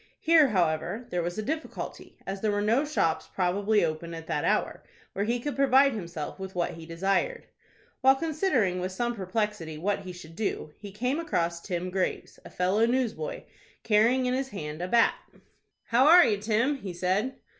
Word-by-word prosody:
Here, 320 -3 +5
however, 180 +2 0
there 180 - 0
was 175 +2 -4
a 215 - -2
difficulty, 310 +6 -5
as 195 0 -5
there 215 - +1
were 205 0 0
no 230 +7 +3
shops 165 - 0
probably 200 +2 +2
open 165 +1 -4
at 165 -1 -8
that 150 -2 -2
hour, - - 0 0.3
where 200 - -1
he 240 +2 0
could 290 +4 -4
provide 275 0 +4
himself 170 -6 -6
with 190 -1 -7
what 175 -1 0
he 165 0 -10
desired. 195 - -1 0.6
While 265 +1 +6
considering 275 - 0
with 185 +1 -3
some 240 +5 -1
perplexity 195 -5 -3
what 200 +6 -1
he 190 -2 -8
should 165 -2 -12
do, 195 -6 -3
he 205 -1 -9
came 250 +9 -1
across 170 - -1
Tim 180 0 -4
Graves, 185 0 -2
a - - -11
fellow 195 +5 +1
newsboy, 255 - -2 0.4
carrying 230 +4 +3
in 250 - +1
his 265 +1 -1
hand 155 -6 -6
a 180 - -2
bat. 230 +4 +4 0.7
"How 250 +4 +3
are 345 +2 +9
you, 205 -2 +1
Tim?" 230 +7 +1
he 195 -8 -7
said. 190 +9 0
205 Hz, 185 wpm, -28 LUFS, 180-255 Hz, 0.7 s, are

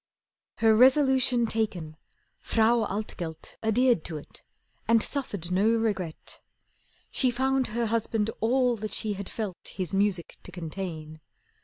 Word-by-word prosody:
Her 220 -1 +4
resolution 260 -1 +5
taken, 195 -9 -2 0.4
Frau 225 0 +2
Altgelt 180 -5 -6
Adhered 230 -3 +2
to 160 - -5
it, 145 - -11 0.5
and 230 -1 +5
suffered 200 - -3
no 195 +4 +3
regret. 195 -8 -3 0.7
She 260 - +2
found 265 +1 +1
her 235 +2 -1
husband 225 -1 0
all 250 +2 +2
that 215 0 -5
she 215 -1 -2
had 200 -1 -6
felt 210 -6 -5
His 185 -3 -4
music 195 -3 0
to - - -10
contain. 160 -3 -6
220 Hz, 130 wpm, -27 LUFS, 185-235 Hz, 0.7 s, resolution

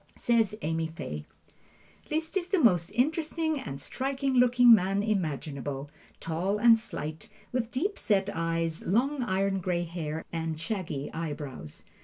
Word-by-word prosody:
Says 225 -4 +2
Amy 160 +1 0
Fay: 75 - -6 0.8
Liszt 320 +3 -1
is 365 -2 0
the 385 -1 +2
most 180 - +4
interesting 315 +3 0
and 135 - -6
striking 270 - -2
looking 245 -1 +7
man 195 0 +3
imaginable, 145 - -2 0.3
tall 175 +5 -1
and 230 +1 +7
slight, 155 -8 -6 0.2
with 245 -2 -1
deep 360 +12 -2
set 200 -3 +2
eyes, 165 -1 -1
long 260 +8 +1
iron 195 -3 0
gray 175 -1 -1
hair, 160 -2 -4
and 160 -1 -2
shaggy 165 -6 -4
eyebrows. 145 - -6
190 Hz, 135 wpm, -29 LUFS, 160-245 Hz, 0.8 s, looking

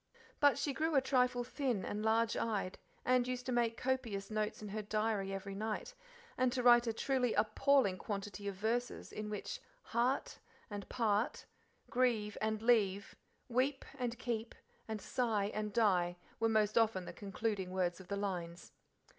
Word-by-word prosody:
But 285 -2 +5
she 285 0 -1
grew 315 +2 0
a - - +8
trifle 250 -2 +2
thin 245 -6 -1
and 210 +1 -3
large 225 +1 +3
eyed, 205 -5 -1 0.3
and 250 -1 +3
used 250 -1 -3
to 255 - -2
make 235 -2 +1
copious 230 -6 -2
notes 215 0 -1
in 210 - -5
her 215 +2 -3
diary 210 -1 0
every 195 0 -4
night, 215 - -3 0.5
and 255 -1 +3
to 255 -1 -1
write 240 0 +7
a - - +2
truly 250 +1 0
appalling 215 -1 +3
quantity 205 -1 -4
of 200 - -2
verses, 230 +5 -2
in 210 0 -5
which - - -4 0.2
"heart" 240 +4 0 0.3
and 205 -1 -6
"part," 225 -1 0 0.5
"grieve" 230 -5 +2
and 220 0 -1
"leave," 205 -5 +3 0.3
"weep" 265 +3 +1
and 240 -1 -2
"keep," 230 -2 -3 0.3
and 220 -1 -3
"sigh" 215 -2 0
and 210 0 -2
"die," 180 -5 +2 0.2
were 225 0 +3
most 215 0 +3
often 215 -5 +2
the - - -7
concluding 200 -1 -2
words 180 -1 0
of 190 - -12
the 200 - -2
lines. 175 -4 -4
220 Hz, 165 wpm, -35 LUFS, 200-245 Hz, 0.5 s, a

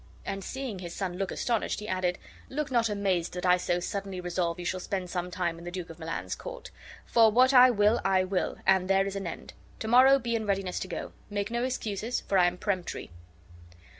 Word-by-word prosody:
And 195 0 -4
seeing 255 -6 -5
his 175 -2 -7
son 180 -3 -3
look 195 - -1
astonished, 235 -3 -1
he 210 - -7
added: 185 -2 0 0.3
"Look 290 0 -3
not 235 -3 +2
amazed, 195 -4 0
that 180 - -3
I 180 0 +5
so 180 0 0
suddenly 195 +1 -4
resolve 175 -1 -1
you 175 - -6
shall 185 +1 -1
spend 185 -2 -4
some 180 -1 -2
time 170 -2 -2
in - - -11
the 175 - -5
Duke 175 -2 -6
of 165 - -13
Milan's 165 0 -4
court; - - -8 0.3
for 225 -2 +5
what 255 +4 +5
I 255 0 +9
will 215 0 +3
I 190 -1 +3
will, 185 0 -1
and 190 -1 +4
there 195 0 +4
is 195 0 -4
an 195 -2 -3
end. - - -7 0.2
Tomorrow 255 +5 +6
be 235 -3 -3
in 220 -2 -2
readiness 195 -2 -1
to - - -4
go. 175 - -5 0.2
Make 205 +1 -2
no 235 +1 0
excuses, 230 -2 -2
for 195 - +1
I 175 - +6
am 175 0 -2
peremptory." 185 - -3
195 Hz, 220 wpm, -29 LUFS, 180-225 Hz, 0.3 s, I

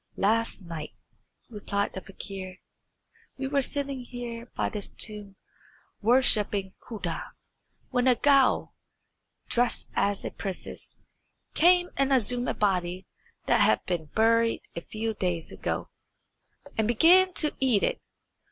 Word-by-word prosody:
"Last 225 0 +1
night," 165 -3 -7 0.5
replied 205 -2 -3
the 190 - -6
fakir, 190 -1 -8 0.8
"we 270 - -3
were 280 +1 +1
sitting 275 0 -1
here 245 -1 -7
by - - 0
this 210 -2 -3
tomb 210 -3 -4 0.7
worshipping 210 -5 +3
Khuda, 220 -3 -5 0.7
when 250 0 +1
a 250 - +6
ghoul, 275 0 +3 0.7
dressed 245 0 0
as 200 -1 0
a - - -3
princess, 190 -2 -6 0.6
came 355 +2 +4
and 275 0 +2
exhumed 245 -1 +3
a - - -2
body 185 -2 0 0.4
that - - +3
had - - +3
been 175 -3 -2
buried 230 +6 +2
a 170 - -4
few 220 +4 -4
days 180 -5 -2
ago, - - -4 0.8
and 220 -1 +1
began 355 +11 +6
to 300 - +1
eat 250 -7 +2
it. - - 0
225 Hz, 125 wpm, -27 LUFS, 195-260 Hz, 0.8 s, a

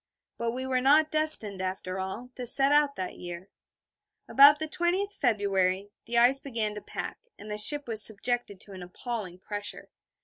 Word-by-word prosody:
But 235 0 -3
we 260 +1 -5
were 260 -1 -2
not 300 +4 +2
destined, 305 -11 +5
after 185 0 -6
all, 190 +7 -8
to 250 -1 -8
set 275 +3 +4
out 290 -1 +1
that 185 - -8
year. 175 +2 -10 0.8
About 285 +2 +5
the 315 +1 -5
20th 365 +5 -3
February, 200 - -2 0.2
the 235 +1 -2
ice 245 +3 +4
began 230 -6 -5
to 210 - -10
pack, - - -8 0.2
and 210 +1 -11
the 210 - -6
ship 290 +6 +2
was 220 -2 +2
subjected 220 -1 +3
to 205 - -11
an 190 -1 -11
appalling 185 0 -8
pressure. 205 +2 -7
230 Hz, 175 wpm, -26 LUFS, 195-275 Hz, 0.8 s, destined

